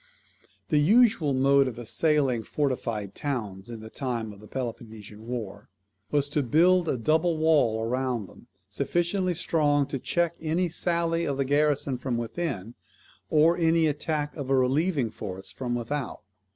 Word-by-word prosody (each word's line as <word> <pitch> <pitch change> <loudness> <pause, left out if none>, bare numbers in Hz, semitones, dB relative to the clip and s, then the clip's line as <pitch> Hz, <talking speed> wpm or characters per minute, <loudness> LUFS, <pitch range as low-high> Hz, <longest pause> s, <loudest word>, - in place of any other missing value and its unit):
The 150 - +3
usual 200 - +4
mode 135 +1 +4
of 125 -2 -5
assailing 135 0 +1
fortified 115 -7 -2
towns 105 -9 -4
in 115 -2 -7
the 110 - -9
time 115 -5 -3
of 100 - -15
the 105 - -13
Peloponnesian 110 -3 -7
war, 115 -5 -6 0.4
was 145 -1 +1
to 150 0 0
build 170 +6 +3
a - - 0
double 160 +7 +1
wall 140 -9 +2
round 125 -3 -1
them, - - -17 0.2
sufficiently 175 +1 0
strong 145 -3 +2
to 135 - -3
check 170 +5 0
any 165 +3 0
sally 170 0 0
of 140 -2 -2
the 135 - 0
garrison 145 -2 +1
from 125 -2 -2
within, 120 - -4 0.6
or 160 +2 +4
any 165 -1 +3
attack 150 0 -2
of 140 -4 -5
a 135 - +3
relieving 135 - +1
force 95 -3 -7
from 125 -2 -3
without. 130 +4 -4
140 Hz, 150 wpm, -27 LUFS, 120-160 Hz, 0.6 s, usual